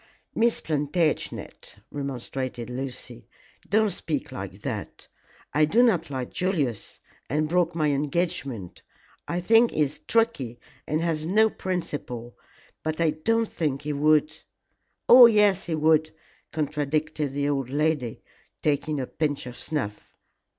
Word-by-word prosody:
"Miss 235 +1 +2
Plantagenet," 155 +1 -2 0.2
remonstrated 130 -3 -4
Lucy, 125 - -6 0.4
"don't 215 0 +3
speak 160 -4 -3
like - - -7
that. - - -5 0.5
I 155 +2 +4
do 225 +11 +4
not 180 -10 +2
like 130 -3 -4
Julius, 155 - -2 0.3
and 150 +4 +1
broke 175 0 +1
my 155 -3 +2
engagement. 140 - -2 0.5
I 175 - -1
think 225 +6 +5
he - - -1
is 145 0 0
tricky, 185 - +1 0.3
and 155 +2 0
has 160 -2 -1
no 215 +4 +4
principles, 145 -10 -4 0.5
but 155 0 -3
I 165 -2 +3
don't 225 +10 +1
think 145 -7 -2
he 150 0 -2
would 150 +1 +3 0.5
" - - -49
"Yes, 210 -6 +8
he 165 - 0
would," 155 0 +3 0.4
contradicted 150 -1 -1
the 140 0 0
old 135 -3 -1
lady, 145 -4 -1 0.4
taking 150 0 0
a 130 - -2
pinch 145 0 -2
of 125 -1 -8
snuff. 125 -10 -5
155 Hz, 130 wpm, -26 LUFS, 140-170 Hz, 0.5 s, Yes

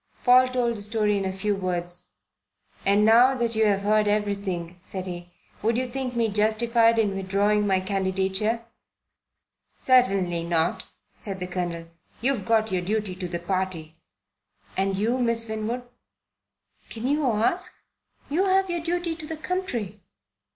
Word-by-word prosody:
Paul 255 +1 +6
told 245 -2 0
the - - -5
story 210 0 +1
in 195 -1 -1
a 190 - -1
few 200 +2 -1
words. 180 -1 -3 0.8
"And 205 +2 +4
now 240 +4 +6
that 235 -2 -1
you 220 0 +3
have 200 -1 +2
heard 210 +1 +2
everything," 200 -4 -2
said 185 -1 -5
he, 175 -1 -7 0.3
"would 225 +2 +1
you 255 - 0
think 255 0 -4
me 230 -1 +2
justified 225 +2 +3
in 205 -3 +1
withdrawing 200 +2 +1
my 190 -1 +2
candidature?" 195 +3 -1 1.1
"Certainly 195 -9 +2
not," 170 -1 0 0.3
said 195 -3 -6
the 180 - -3
Colonel. 175 -2 -4 0.3
"You've 245 -5 0
got 220 -2 +2
your 185 -1 0
duty 205 +1 -2
to 185 -1 -5
the 175 0 -3
Party." 175 -3 -3 0.8
"And 195 0 0
you, 225 +6 0
Miss 230 -1 0
Winwood?" 220 +3 -3 1.1
"Can 225 +1 -6
you 295 +3 +1
ask? 240 - 0 0.5
You 340 +7 +1
have 385 -1 +2
your 345 -1 -2
duty 345 0 -2
to 310 -3 -7
the 320 0 -5
country." 245 - -3
210 Hz, 150 wpm, -25 LUFS, 190-240 Hz, 1.1 s, Paul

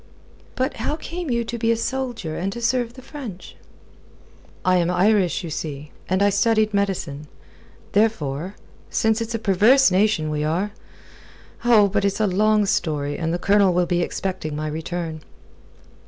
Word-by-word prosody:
"But 260 +2 -1
how 300 - -2
came 335 +1 -6
you 235 -1 +1
to 235 +1 -5
be 225 0 +2
a 230 - +1
soldier, 240 -9 -3
and 190 +3 -2
to 235 - -6
serve 235 0 0
the 260 - -12
French?" 250 - -9 1.1
"I 185 0 +4
am 175 -1 +1
Irish, 190 0 +2
you 165 - -5
see, 150 -1 -5 0.2
and 185 +2 +2
I 205 - +4
studied 215 +1 +2
medicine. 175 -7 -2 0.6
Therefore 190 -5 0 0.3
since 220 0 +1
it's 230 0 -3
a - - +1
perverse 220 +5 +4
nation 185 -5 +2
we 150 0 -1
are.... 175 +7 -1 0.9
Oh, 225 -4 +6
but 200 +1 0
it's 200 +1 0
a 215 - +3
long 210 +2 +3
story, 150 -6 -1
and 165 -1 -2
the 175 - 0
Colonel 195 0 +3
will 180 0 +3
be 175 0 0
expecting 175 -4 -3
my 155 +1 -3
return." 160 +1 -4
200 Hz, 165 wpm, -22 LUFS, 170-225 Hz, 1.1 s, Oh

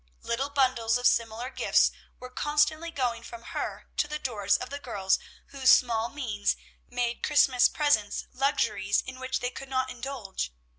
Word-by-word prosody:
Little 265 +4 -1
bundles 255 -5 +2
of 245 - -5
similar 230 +2 +1
gifts - - +3 0.3
were 255 0 -9
constantly 300 +4 +1
going 250 -7 -1
from 235 0 -10
her - - -5
to - - +2
the 300 0 -3
doors 215 -9 0
of 250 - -7
the 285 - -4
girls 200 -8 0 0.3
whose 270 -2 +1
small 230 -2 +4
means 225 -8 -1 0.3
made 245 -1 -2
Christmas 265 -4 +4
presents 285 -9 +1
luxuries 210 -7 +1
in 260 0 -8
which 260 0 -2
they 245 - -1
could 270 +1 -9
not 260 -1 0
indulge. 235 - -5
250 Hz, 160 wpm, -28 LUFS, 230-275 Hz, 0.3 s, small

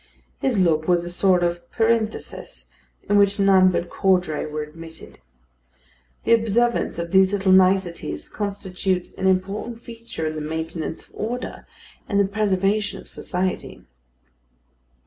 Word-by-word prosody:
His 260 -5 0
look 160 -4 +2
was 175 -1 +2
a 175 - -3
sort 180 0 +3
of 170 0 -2
parenthesis 225 -1 -2 0.4
in 205 0 +4
which 200 0 +3
none 190 -1 +6
but 175 -1 -1
Caudray 180 -6 +1
were 150 0 -4
admitted. 160 +2 -12 1.0
The 230 - +4
observance 230 -1 +2
of 170 0 -4
these 190 0 +4
little 195 -1 +2
niceties 185 - +2
constitutes 190 -3 -3
an 190 - -1
important 195 +5 -1
feature 230 -8 -7
in 155 - -2
the 155 - -5
maintenance 160 +1 -4
of - - -29
order 245 +4 -5 0.4
and 200 - +2
the 200 - +4
preservation 200 0 0
of - - -13
society. 185 0 -3
190 Hz, 135 wpm, -23 LUFS, 170-205 Hz, 1.0 s, none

